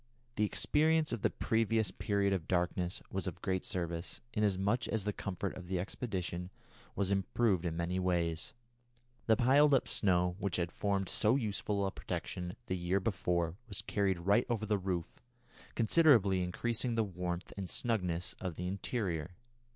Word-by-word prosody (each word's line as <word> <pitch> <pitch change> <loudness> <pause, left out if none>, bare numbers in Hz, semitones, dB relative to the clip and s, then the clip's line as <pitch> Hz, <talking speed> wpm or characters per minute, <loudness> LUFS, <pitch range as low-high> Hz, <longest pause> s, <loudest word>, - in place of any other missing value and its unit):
The 105 - +2
experience 155 +7 +2
of 115 - -3
the - - +3
previous 110 -1 +1
period 100 -1 +1
of 85 -5 -2
darkness 90 0 0
was - - -2
of - - -5
great 95 -1 0
service, 85 -1 -3
inasmuch 105 +2 +1
as 110 -3 -1
the 105 0 -1
comfort 100 0 -4
of 90 -1 -9
the 95 0 -1
expedition 90 -3 -3 0.5
was 100 0 0
improved 95 -1 +1
in 80 -1 -3
many 85 +2 -1
ways. 85 -3 -1 0.7
The 110 - +6
piled 140 +4 +5
up 130 - +1
snow 90 -2 +2
which 100 -3 -1
had 85 -1 -1
formed 100 -2 -1
so 110 +6 +3
useful 105 -4 -1
a 95 - -1
protection 90 -1 -4
the 95 - -2
year 90 +2 0
before 90 -4 -1
was 100 - -4
carried 95 -4 0
right 100 +6 +3
over 110 -3 0
the 105 -1 +1
roof, 90 -3 -3 0.5
considerably 115 - +5
increasing 115 +6 -1
the 115 - +3
warmth 90 -2 -4
and 95 -3 -5
snugness 90 -8 -1
of 90 -3 -3
the 90 - -4
interior. 90 - -2
95 Hz, 160 wpm, -33 LUFS, 90-110 Hz, 0.7 s, The